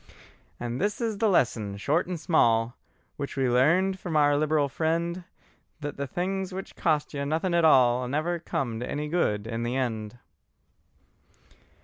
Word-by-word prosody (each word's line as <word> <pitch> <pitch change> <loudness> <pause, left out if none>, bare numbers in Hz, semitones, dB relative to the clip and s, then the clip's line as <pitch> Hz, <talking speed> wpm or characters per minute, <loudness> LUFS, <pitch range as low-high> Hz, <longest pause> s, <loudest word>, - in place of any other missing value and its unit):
And 120 +3 -4
this 205 +1 0
is 225 -4 -2
the 220 -1 +3
lesson 110 - +1
short 150 - 0
and 180 -2 -4
small, 120 -7 +2 0.4
Which 140 -1 -5
we 135 -1 +2
learned 170 +10 +3
from 170 -4 -2
our 145 -1 +4
liberal 150 0 +2
friend, 170 +4 -1 0.5
That 145 -2 -5
the 140 0 -3
things 190 +6 -2
which 190 +1 -7
cost 155 -4 0
you 140 -1 -3
nothing 160 +5 -1
at 170 -1 +4
all 125 -4 +5
Never 155 +6 -1
come 120 -8 -3
to 120 - -5
any 150 +1 -3
good 110 -11 0
in 115 0 -4
the 120 +2 -2
end. 115 -4 -3
150 Hz, 160 wpm, -27 LUFS, 125-170 Hz, 0.5 s, all